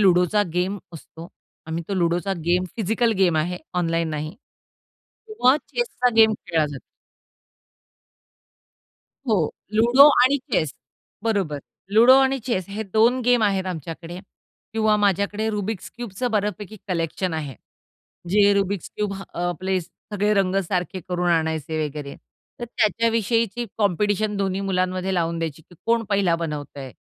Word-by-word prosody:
लुडोचा 185 +1 +4
game 185 +3 -1 0.2
असतो. 165 +1 -11 0.4
आम्ही 160 +1 -3
तो 200 - -1
लुडोचा 175 +2 0
गेम, 180 +2 +2
फिजिकल 225 +2 +1
गेम 175 -4 +3
आहे, 175 +3 -1 0.2
ऑनलाइन 165 -2 0
नाही 155 +2 -4 0.9
किंवा 285 - +3
चेसचा 460 - 0
गेम 220 -1 +7
खेळला 160 -3 +1
जा 135 - -6 2.5
हो, 185 -9 +2 0.3
लुडो 240 +6 +7
आणि 265 +3 +4 0.2
चेस. 155 -8 +1 0.5
बरोबर, 200 -10 0 0.3
लुडो 235 +5 +7
आणि 270 0 +2
चेस 190 -7 0
हे 205 +2 -4
2 235 +4 +4
गेम 245 -1 +4
आहेत 195 -3 +1
आमच्याकडे 165 0 -6 0.5
किंवा 220 -1 +2
माझ्याकडे 205 +1 +1
रुबिक्स 210 -1 -4
क्यूबचं 240 +1 -4
बऱ्यापैकी 210 -1 -2
कलेक्शन 170 0 -2
आहे, 145 -4 -4 0.8
जे 205 +1 +5
रुबिक्स 200 -1 -1
क्यूब, 210 -1 -2 0.2
अ, - - -6
आपले 185 +2 -1
सगळे 205 +4 -2
रंग 195 -2 +1
सारखे 185 0 -2
करून 180 0 0
आणायचे 160 -2 0
वगैरे. 145 -1 -6 0.4
तर 240 - -4
त्याच्याविषयीची 230 0 +1
कॉम्पिटिशन 205 +1 +1
दोन्ही 195 -1 -1
मुलांमध्ये 185 -1 -1
लावून 170 -2 0
द्यायची, 160 -2 -4
की 175 - -20
कोण 230 0 +2
पहिला 195 -4 +2
बनवतंय, 145 -5 -6
195 Hz, 130 wpm, -23 LUFS, 170-220 Hz, 2.5 s, गेम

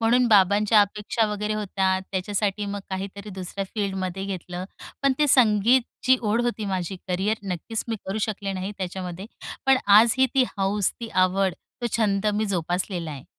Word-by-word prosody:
म्हणून 240 +2 +3
बाबांच्या 205 +1 +5
अपेक्षा 210 +2 0
वगैरे 210 +1 -2
होत्या 190 -2 0
त्याच्यासाठी 200 +2 -1
मग 200 0 -4
काहीतरी 195 +2 -5
दुसऱ्या 190 +1 -5
फील्डमध्ये 195 -3 -2
घेतलं. 180 -2 -5 0.4
पण 275 -1 +4
ते 300 - +4
संगीतची 245 +1 +4
ओढ 220 +1 +1
होती 235 -3 -2
माझी. 190 -1 -2
करियर 190 +4 0
नक्कीच 195 +4 -4
मी 225 - -1
करू 195 +3 -2
शकले 205 -2 -2
नाही 190 +1 -4
त्याच्यामध्ये, 185 0 -5 0.4
पण 270 0 +6
आजही 225 +6 +6
ती 265 - +5
हौस, 195 0 +1
ती 230 - -5
आवड, 185 -1 +2 0.3
तो 240 - 0
छंद 210 -2 +1
मी 215 - 0
जोपासलेला 175 -2 -2
आहे. 140 -3 -8
200 Hz, 155 wpm, -24 LUFS, 190-215 Hz, 0.4 s, पण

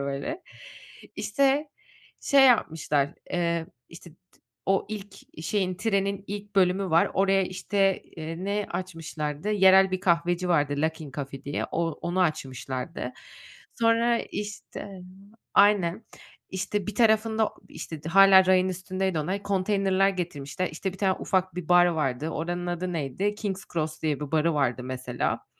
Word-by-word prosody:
böyle. 140 - -4 0.7
İşte, 280 +2 +1 0.5
şey 275 -2 +5
yapmışlar, 155 - +2 0.2
eee, 170 -2 0 0.2
işte, 170 0 -13
t - - -33 0.3
o 195 0 +2
ilk 200 -6 -9
şeyin, 185 0 0
trenin 200 -1 -1
ilk 205 0 -7
bölümü 185 0 +2
var. 165 +1 +4
Oraya 195 0 +3
işte, 195 +1 0
eee, 165 +3 -7
ne 205 0 -1
açmışlardı? 165 -1 -4
Yerel 190 -1 +6
bir 185 -1 -2
kahveci 175 -1 +1
vardı 145 -4 +2
Luckin 160 -2 -2
Coffee 135 0 -6
diye. 145 - -2
O 165 0 0
onu 175 +4 -3
açmışlardı. 135 -3 -3 0.7
Sonra, 230 +1 +3
işte 210 0 -7 0.7
Aynen, 200 -1 +4 0.5
işte, 195 +1 -2
bir 210 - -4
tarafında, 220 0 +3 0.2
işte, 160 -3 -8
o - - -3
hâlâ 195 0 +7
rayın 185 0 +4
üstündeydi 185 -1 -2
onlar, 185 +6 -3
konteynerler 195 -1 +2
getirmişler. 175 -1 -4
İşte, 190 +4 -3
bir 190 - -13
tane 190 -1 +2
ufak 185 -2 0
bir 180 -2 -6
bar 175 0 +6
vardı, 150 -4 -1
oranın 175 +2 -3
adı 175 +1 -3
neydi? 165 +6 -2
King's 200 -3 -4
Cross 155 -2 -3
diye 150 -3 0
bir 150 +1 -6
barı 160 +1 +2
vardı 130 -3 0
mesela. 125 -1 -3
185 Hz, 140 wpm, -26 LUFS, 160-200 Hz, 0.7 s, hâlâ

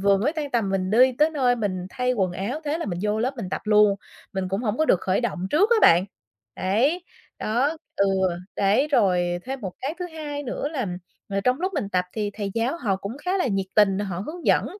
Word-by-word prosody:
vừa 200 0 +4
mới 245 +11 0
tan 300 -3 -4
tầm 225 -6 0
mình 190 -1 -1
đi 255 +4 +5
tới 305 +2 +4
nơi 255 -5 +2
mình 185 -5 -2
thay 250 0 0
quần 190 -6 0
áo, 225 - -3
thế 300 +3 -1
là - - -3
mình 175 -3 -3
vô 210 +1 0
lớp 255 +4 -1
mình 205 -6 -5
tập - - -2
luôn, 210 -1 +5 0.4
mình 190 -1 -2
cũng 195 +5 -2
hổng 215 -1 -1
có 315 - +3
được 185 - +3
khởi 190 +3 +1
động 190 -6 -2
trước 400 - +3
á 470 - +6
bạn. 175 +3 +6 0.5
Đấy, 265 - +1 0.3
đó, 265 +9 0 0.2
ừ, 200 - +3 0.5
đấy 205 +9 +3
rồi 180 -8 +2
thêm 265 0 -5
một 190 -3 -5
cái 280 +4 -3
thứ 360 - -3
hai 300 -3 -6
nữa 280 +2 -3
là 265 -8 -3 0.4
là 200 0 -1
trong 250 +7 +1
lúc 375 +1 -1
mình 215 -9 -1
tập 180 -2 +1
thì 210 -2 -2
thầy 205 -2 -3
giáo 235 +8 0
họ 200 - 0
cũng 200 +5 -6
khá 370 +2 +1
là 360 - +1
nhiệt 195 -4 -1
tình, 200 -2 +4
họ 195 -4 -3
hướng 340 +2 -7
dẫn, - - +4
220 Hz, 240 wpm, -24 LUFS, 195-285 Hz, 0.5 s, á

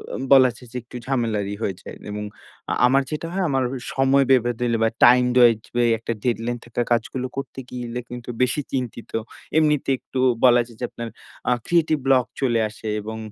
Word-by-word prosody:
অ - - -3
বলা 130 -2 +8
যায় 125 -1 -14
যে 125 - -5
একটু 120 - -15
ঝামেলারই 110 -6 -1
হয়ে 95 -4 -1
যায়। - - -9 0.2
এবং 105 0 -4 0.5
আ - - +1
আমার 135 +2 +4
যেটা 155 +2 -3
হয় 195 -1 0
আমার 135 -1 +1
ওই 125 - -5
সময় 135 +1 +4
বেঁধে 120 -2 +4
দিলে 120 -1 +1
বা 115 - +4 0.2
টাইম-ওয়াইজ 125 -2 +5 0.2
বা 120 - +3
ওই - - +3
একটা 115 - -3
ডেডলাইন 120 0 -1
থাকা 120 +1 -3
কাজগুলো 125 +2 0
করতে 135 -1 -5
গেলে 125 -1 -5
কিন্তু 120 0 -8
বেশি 125 +4 +2
চিন্তিত। 125 -3 -4 0.5
এমনিতে 150 -3 +2
একটু 130 - -6 0.3
বলা 120 -1 +6
যায় 115 -2 -16
যে 125 - -1
আপনার 115 -1 -6 0.4
আ - - +3
ক্রিয়েটিভ 160 -3 +2
ব্লক 130 -2 +4 0.2
চলে 120 -4 +2
আসে 110 +1 -10
এবং 110 +1 -6
125 Hz, 195 wpm, -23 LUFS, 115-135 Hz, 0.5 s, বলা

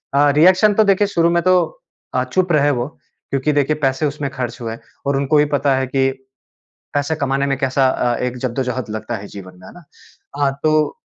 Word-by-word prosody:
अ, 145 +1 +5
reaction 185 +5 +5
तो 220 - +4
देखिए, 200 +1 +3
शुरू 170 -4 +2
में 170 0 +1
तो 185 0 +4 0.6
अ, 125 - +2
चुप 175 +8 0
रहे 145 -2 +3
वो 120 +2 -2 0.4
क्योंकि 140 +2 0
देखिए, 145 +1 +1
पैसे 135 +2 +1
उसमें 145 -1 -3
खर्च 125 -3 -4
हुए 115 -1 -4 0.3
और 140 0 +1
उनको 140 +2 +2
भी 150 - +5
पता 140 -1 +1
है 130 0 0
कि 135 0 +1 0.8
पैसे 145 +2 0
कमाने 140 -2 -1
में 135 -1 0
कैसा 135 0 +1
अ, 120 -2 0
एक 125 0 -3
ज़द्दोज़हद 125 -1 -3
लगता 110 +2 -4
है 100 - -9
जीवन 95 -2 -10
में। 90 - -14
है - - -13
ना? 175 - -14 0.5
हाँ, 140 -1 +2
तो 155 - +1
140 Hz, 205 wpm, -19 LUFS, 130-155 Hz, 0.8 s, अ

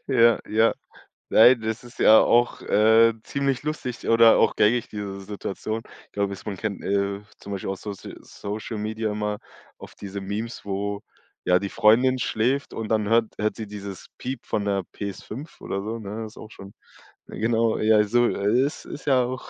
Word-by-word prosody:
Ja, 120 -3 +5
ja. 110 +1 +3 0.6
Nein, 120 +2 +7
das 110 +1 -3
ist 120 0 -14
ja 110 - +8
auch, 120 +1 +3
äh, 110 +2 +5
ziemlich 140 -2 -1
lustig 145 -5 -4
oder 115 0 +6
auch - - +3
gängig 115 +3 +2
diese 100 -2 -6
Situation. 105 +2 -5 0.2
Ich - - -36
glaube 100 -1 -1
es 95 - -11
man 105 - -4
kennt, 100 0 -4
äh, 100 0 -1 0.2
zum 100 - -9
Beispiel 95 - -4
aus 95 - -5
Social 100 -2 -8
Social 105 +2 -6
Media 110 +1 -2
immer 105 0 -3 0.4
auf - - -12
diese 100 0 -7
Memes, 105 +4 -5
wo, 100 +1 -3 0.4
ja, 90 - +4
die 100 +2 -3
Freundin 125 +6 +4
schläft 125 +5 0
und 115 -1 -5
dann 110 -2 +1
hört 115 0 +4
hört 105 0 0
sie 110 - -6
dieses 100 -2 -8
Piep 130 -1 -5
von 105 - -1
'ner 100 -1 0
PS5 105 - -7
oder 100 - -3
so, 110 +3 -4
ne, 110 +1 -6
ist 110 - -12
auch 110 - -11
schon 100 +1 -12 0.5
ja, - - -9
genau, 115 0 +1
ja, 110 -1 +4
so 120 +4 +2
ist 120 +9 0
ist 150 - -9
ja 130 -3 +4
auch 130 +1 -5
110 Hz, 185 wpm, -24 LUFS, 100-115 Hz, 0.6 s, ja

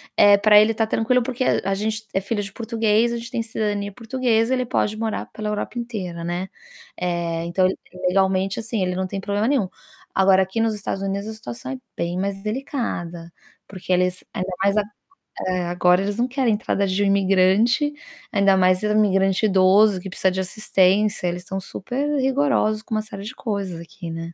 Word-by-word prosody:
eh, 205 0 +7
pra 210 0 +6
ele 220 +1 +4
tá 225 0 +1
tranquilo, 235 +3 +1
porque 255 +1 -2
é - - +2
a 195 - +1
gente 220 +2 -2
é 195 - +1
filho 205 +1 -2
de 195 - -7
português, 225 0 +1
a 235 - -2
gente 230 +1 -8
tem 235 -2 -1
cidadania 205 -2 -2
portuguesa, 230 +1 0
ele 255 -1 0
pode 215 -3 0
morar 220 0 -3
pela 215 -1 -4
Europa 215 +3 -3
inteira, 185 -8 -5
né. 175 +2 -3 0.5
Eh, 170 -1 -2
então, 185 +2 +1
ele, 185 - 0 0.3
legalmente, 190 +1 +1
assim, 225 -3 -2
ele 180 0 -1
não 185 0 -2
tem 195 +1 -4
problema 205 +2 -1
nenhum. 255 -8 +2 0.5
Agora, 190 0 +5
aqui 190 +5 -4
nos 225 -1 +1
Estados 195 -1 -4
Unidos, 200 +1 -3
a 220 - -5
situação 130 - -7
é 130 - -4 0.2
bem 170 +1 -2
mais 195 0 -2
delicada, 210 - -4 0.4
porque 185 -1 -7
eles, 180 0 +1
ainda 185 0 -3
mais 200 +1 +2
ag 205 -1 +1 0.6
eh, 185 -1 0
agora 180 +1 +3
eles 205 +1 -2
não 245 +2 +1
querem 255 -3 +1
entrada 200 -2 -1
de 190 +1 0
imigrante, 200 +8 +3 0.4
ainda 195 -1 +4
mais 185 +1 +3
imigrante 205 -1 +2
idoso, 195 0 +4
que 190 - -7
precisa 190 0 +1
de 190 +1 -1
assistência. 195 0 +1
Eles 175 +1 -3
tão 195 0 -4
super-rigorosos 270 0 0
com 225 - -8
uma 215 - +1
série 200 -2 -8
de 225 - -6
coisas 200 -7 -4
aqui, 170 0 -9
né? 165 +1 -6
200 Hz, 190 wpm, -22 LUFS, 185-225 Hz, 0.6 s, eh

